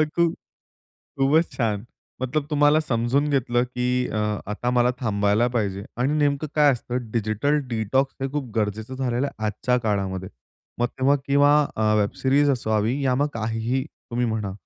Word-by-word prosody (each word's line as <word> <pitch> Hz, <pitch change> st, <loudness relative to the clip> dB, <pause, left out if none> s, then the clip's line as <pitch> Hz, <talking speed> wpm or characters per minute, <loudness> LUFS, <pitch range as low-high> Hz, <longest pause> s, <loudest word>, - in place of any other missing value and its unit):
खूप 170 Hz, -1 st, +3 dB, 0.8 s
खूपच 150 Hz, +5 st, +3 dB
छान. 110 Hz, -4 st, 0 dB, 0.4 s
मतलब 140 Hz, +3 st, -1 dB
तुम्हाला 150 Hz, +1 st, +4 dB
समजून 135 Hz, +2 st, 0 dB
घेतलं, 120 Hz, -3 st, +1 dB
की 125 Hz, 0 st, -1 dB
अ, 110 Hz, -, -3 dB, 0.3 s
आता 120 Hz, +3 st, -2 dB
मला 125 Hz, 0 st, +3 dB
थांबायला 105 Hz, 0 st, +2 dB
पाहिजे 100 Hz, -3 st, -1 dB
आणि 130 Hz, +4 st, +1 dB
नेमकं 145 Hz, 0 st, +1 dB
काय 150 Hz, -2 st, +6 dB
असतं 125 Hz, -1 st, -4 dB
डिजिटल 115 Hz, +7 st, +1 dB
डिटॉक्स 120 Hz, +4 st, 0 dB
हे 135 Hz, -, 0 dB
खूप 140 Hz, -6 st, -4 dB
गरजेचं 110 Hz, +4 st, -2 dB
झालेलं 130 Hz, +1 st, -1 dB
आहे 110 Hz, -, -9 dB
आजच्या 115 Hz, +4 st, 0 dB
काळामध्ये. 95 Hz, -3 st, -1 dB, 0.5 s
मग 120 Hz, -, +2 dB
तेव्हा 135 Hz, +3 st, +2 dB
किंवा 145 Hz, +1 st, +5 dB, 0.2 s
अ, 110 Hz, 0 st, +2 dB
वेब 100 Hz, -, 0 dB
सीरीज 140 Hz, +2 st, +3 dB
असावी 115 Hz, +1 st, 0 dB
या 130 Hz, -2 st, +2 dB
मग 145 Hz, +2 st, +1 dB
काहीही 115 Hz, +3 st, -1 dB
तुम्ही 120 Hz, -5 st, -4 dB
म्हणा. 110 Hz, -4 st, -2 dB
125 Hz, 155 wpm, -24 LUFS, 110-140 Hz, 0.8 s, काय